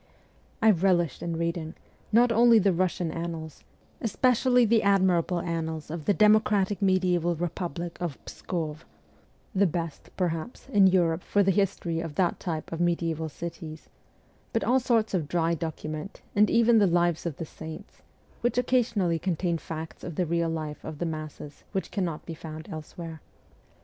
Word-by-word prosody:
I 220 - +8
relished 175 -4 +2
in 170 -1 -3
reading, 170 0 -2 0.4
not 235 +2 +5
only 230 0 +6
the 200 -3 +3
Russian 175 -1 0
annals, 165 -2 -6 0.4
especially 250 +2 +3
the 225 0 +4
admirable 185 -3 +2
annals 160 -3 -3
of 160 -2 -5
the 205 - +4
democratic 210 -2 +3
mediaeval 180 -3 +2
republic 170 0 -4
of 170 -6 -3
Pskov 160 -3 -4 0.7
the 200 -1 +4
best, 165 -2 -4
perhaps, 175 +7 -3
in 200 -7 +6
Europe 175 -2 +2
for 205 +2 +2
the 195 - +3
history 185 -4 0
of 165 -3 -5
that 180 0 +1
type 160 -4 -4
of 165 +1 -3
mediaeval 165 -2 0
cities 160 0 -8 0.6
but - - +1
all 255 +2 +3
sorts 230 -4 +1
of 170 -6 0
dry 170 0 +1
documents, 155 +2 -5
and 210 +1 +5
even 230 0 +5
the 200 - +5
Lives 175 -1 +1
of 155 - -5
the 165 - -4
Saints, 160 +1 -10 0.4
which 240 +1 0
occasionally 230 -9 +2
contain 170 -1 -1
facts 160 0 -7
of 170 - -6
the 180 - +1
real 170 0 0
life 155 -2 -4
of 155 -1 -6
the 175 - -2
masses 155 -2 -6
which 190 - -2
cannot 175 -6 -2
be 165 - -5
found 155 0 -8
elsewhere. 160 0 -8
170 Hz, 160 wpm, -27 LUFS, 160-195 Hz, 0.7 s, I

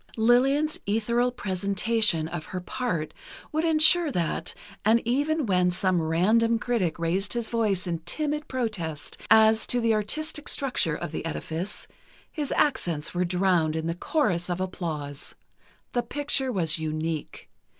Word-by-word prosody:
Lillian's 270 +7 +3
ethereal 235 +4 +1
presentation 200 -3 0
of 165 -1 -6
her 185 - -5
part 180 - -3 0.4
would 315 +1 0
insure 320 0 +6
that, 170 -8 -2 0.3
and 220 +3 +4
even 290 +5 +1
when 180 -3 +2
some 180 -1 +1
random 215 +9 +2
critic 225 -9 -1
raised 180 +4 -1
his 235 -2 -2
voice 210 -5 0
in 170 -2 -2
timid 300 - -2
protest 205 - -4
as 220 0 +5
to 245 - +1
the 230 -1 +2
artistic 300 +9 -2
structure 250 - +1
of - - -5
the - - -4
edifice, 165 +4 -5 0.4
his 295 -4 -4
accents 170 - 0
were 180 0 0
drowned 175 -3 +1
in 160 0 -2
the 165 - -1
chorus 180 - -1
of 175 0 -2
applause: 155 -6 -5 0.6
The 245 - +1
picture 270 +1 0
was 165 -6 0
unique. 155 0 -4
200 Hz, 140 wpm, -26 LUFS, 170-245 Hz, 0.6 s, insure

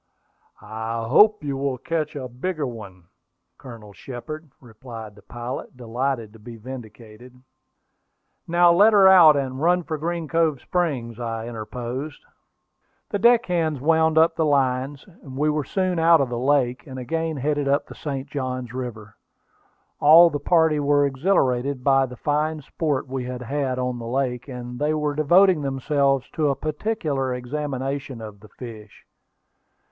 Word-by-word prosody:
"I 110 +1 -4
hope 210 - +5
you 140 -2 -3
will 140 0 -1
yet 125 - -10
catch 165 -3 -2
a 130 -3 -5
bigger 150 +6 -3
one, 100 -7 -9 0.6
Colonel 115 -5 -11
Shepard," 150 +8 -8
replied 115 -2 -10
the 105 - -17
pilot, 120 +4 -7
delighted 120 -1 -3
to 115 - -15
be 115 +2 -10
vindicated. 115 0 -11 1.1
"Now 175 0 +5
let 205 +5 +5
her 195 -2 +7
out, 170 -6 +8
and 130 -1 -3
run 175 +2 +2
for 155 -2 -4
Green 170 0 -3
Cove 160 -3 +1
Springs," 130 -9 -2
I 115 -1 -4
interposed. 120 +5 -6 0.9
The 205 - -1
deck 235 +1 +5
hands 160 -5 -1
wound 160 +2 +2
up 165 +1 +4
the 160 - 0
lines; 135 -1 0 0.2
we 145 +2 -1
were 150 0 -1
soon 185 +3 -1
out 165 0 +5
of 135 -3 0
the 120 -1 -3
lake, 125 -2 +1
and 130 -1 -8
again 160 +5 -3
headed 145 +1 -1
up 140 +1 +1
the - - -11
St. 135 -2 -5
Johns 130 -3 -4
River. 115 -5 -7 0.8
All 165 +3 +7
the 145 - -3
party 160 0 +2
were 145 0 +3
exhilarated 135 -3 0
by 135 -1 +3
the 125 -1 -11
fine 150 +2 -1
sport 145 -2 -2
we 130 -1 -4
had 125 0 -6
had 135 0 -2
on 125 -1 -2
the 115 - -7
lake, 125 0 -2
and 125 -2 -7
they 150 +1 +1
were 150 -1 -1
devoting 175 +3 +4
themselves 135 0 0
to 150 -2 0
a 140 - 0
particular 150 - -2
examination 135 0 -4
of 105 -2 -9
the 105 +1 -16
fish. 110 -4 -11
135 Hz, 160 wpm, -23 LUFS, 125-155 Hz, 1.1 s, out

